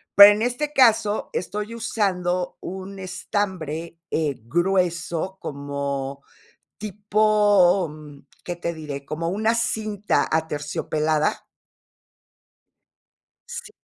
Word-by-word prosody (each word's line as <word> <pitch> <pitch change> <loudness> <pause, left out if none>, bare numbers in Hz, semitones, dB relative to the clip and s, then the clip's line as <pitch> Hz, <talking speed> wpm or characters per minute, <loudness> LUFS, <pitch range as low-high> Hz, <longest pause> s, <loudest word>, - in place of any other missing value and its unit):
Pero 200 +1 +11
en 210 - -3
este 290 +5 -1
caso 220 -4 +4
estoy 210 +5 -3
usando 180 -5 -1
un 190 +1 -7
estambre, 175 -3 -3
eh, 150 -4 0
grueso, 175 +3 0
como 140 -1 -4 0.6
tipo, 205 -3 +3
mm, 150 -2 -12 0.2
¿qué 175 -1 -4
te 170 -1 -3
diré? 145 -3 -6
Como 160 +4 -3
una 220 +4 +1
cinta 215 -3 0
aterciopelada. 155 0 0 2.0
Sí, 430 - -7
180 Hz, 90 wpm, -23 LUFS, 155-205 Hz, 2.0 s, Pero